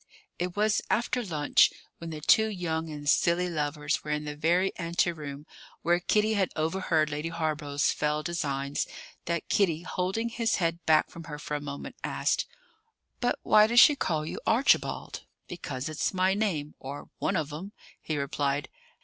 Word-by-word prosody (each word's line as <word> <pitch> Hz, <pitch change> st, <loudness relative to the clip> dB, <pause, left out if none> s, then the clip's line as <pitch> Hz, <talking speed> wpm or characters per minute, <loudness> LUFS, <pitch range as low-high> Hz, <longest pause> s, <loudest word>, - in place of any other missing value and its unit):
It 180 Hz, 0 st, -2 dB
was 210 Hz, 0 st, +2 dB
after 240 Hz, +2 st, +1 dB
lunch, 155 Hz, -7 st, +4 dB, 0.3 s
when 165 Hz, -, -6 dB
the 155 Hz, -1 st, -6 dB
two 220 Hz, +8 st, +5 dB
young 165 Hz, -5 st, -3 dB
and 145 Hz, -1 st, -7 dB
silly 170 Hz, +4 st, +3 dB
lovers 150 Hz, -3 st, -1 dB
were 150 Hz, -, -7 dB
in 150 Hz, 0 st, -1 dB
the 150 Hz, 0 st, -5 dB
very 175 Hz, +5 st, +1 dB
ante 170 Hz, 0 st, +1 dB
room 145 Hz, -3 st, -8 dB, 0.4 s
where 175 Hz, +1 st, +3 dB
Kitty 210 Hz, +4 st, +2 dB
had 195 Hz, -4 st, +1 dB
overheard 160 Hz, -1 st, +1 dB
Lady 150 Hz, +3 st, -3 dB
Hawborough's 155 Hz, -3 st, 0 dB
fell 150 Hz, 0 st, -1 dB
designs, 140 Hz, -5 st, -2 dB, 0.4 s
that 170 Hz, -1 st, -2 dB
Kitty, 170 Hz, -5 st, +1 dB
holding 190 Hz, +6 st, -2 dB
his 230 Hz, -1 st, 0 dB
head 170 Hz, -1 st, -1 dB
back 155 Hz, -1 st, +4 dB
from 165 Hz, 0 st, -10 dB
her 150 Hz, -3 st, -6 dB
for 150 Hz, -, -6 dB
a 145 Hz, -, -1 dB
moment, 140 Hz, -1 st, -7 dB
asked: -, -, 0 dB, 0.7 s
"But 245 Hz, -, +1 dB
why 215 Hz, 0 st, +6 dB
does 235 Hz, +2 st, +5 dB
she 295 Hz, -, +8 dB
call 155 Hz, -, -1 dB
you -, -, -5 dB
Archibald?" 240 Hz, +5 st, +2 dB, 0.3 s
"Because 140 Hz, -7 st, -5 dB
it's 155 Hz, +4 st, -2 dB
my 185 Hz, +1 st, +3 dB
name, 180 Hz, -8 st, -1 dB
or 140 Hz, +2 st, -8 dB
one 195 Hz, -, 0 dB
of 150 Hz, -4 st, -2 dB
'em," 185 Hz, +7 st, -6 dB, 0.3 s
he 155 Hz, -, -3 dB
replied. 140 Hz, 0 st, -1 dB
165 Hz, 170 wpm, -28 LUFS, 150-185 Hz, 0.7 s, she